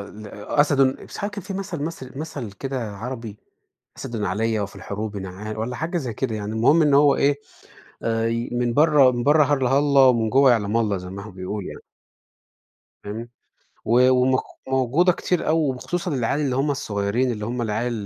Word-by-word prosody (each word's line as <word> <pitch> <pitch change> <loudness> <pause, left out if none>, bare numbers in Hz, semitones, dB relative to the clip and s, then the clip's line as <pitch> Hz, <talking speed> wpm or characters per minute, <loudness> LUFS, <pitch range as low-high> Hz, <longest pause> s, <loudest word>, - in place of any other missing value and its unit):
ال 105 0 -11 0.2
أسَد، 145 +3 +2
مش 130 -1 0
عارف 205 +1 -3
كان 200 -2 -6
فيه 195 -1 -6
مَثَل 190 -6 -4
مصر 135 -5 -7
مَثَل 140 -9 -6
كده 120 -3 -5
عربي، 115 -2 -6 0.6
أسَد 115 -3 -5
عليّا 110 +3 0
وفي 100 0 -5
الحروب 105 0 -5
نعا 95 +3 -6
والّا 115 +3 -3
حاجة 165 +5 -2
زي 130 -8 -4
كده 115 0 -2
يعني. 105 +1 -4
المهم 135 +9 +4
إن 145 -2 +3
هو 145 0 +5
إيه، 140 0 +2 0.6
آآ 115 0 0
ي 115 +1 -2
من 120 -1 0
برّه 145 -3 +5
من 120 -1 -2
برّه 150 +1 +5
هلّه، 135 -2 +2
هلّه 140 -2 +5
ومن 115 -3 +2
جوّه 135 +1 +5
يعلَم 110 -1 +1
الله، 105 -4 +1
زي 90 0 -8
ما 100 +1 -7
هم - - -12
بيقولوا 95 +3 -5
يعني. - - -10 1.2
فاهمني؟ 115 +3 -6 0.5
و 125 +3 +4
ومق 130 0 +3 0.3
موجودة 135 +8 +3
كتير 180 -1 -1
أوي 160 +1 +3
وخصوصًا 175 +7 -3
العيال 130 +3 0
اللي 130 -3 0
هم 140 +2 +1
الصغيرين 110 -1 -1
اللي 105 -3 -4
هم 120 +2 -3
العيال 115 +2 -1
125 Hz, 185 wpm, -23 LUFS, 110-140 Hz, 1.2 s, هو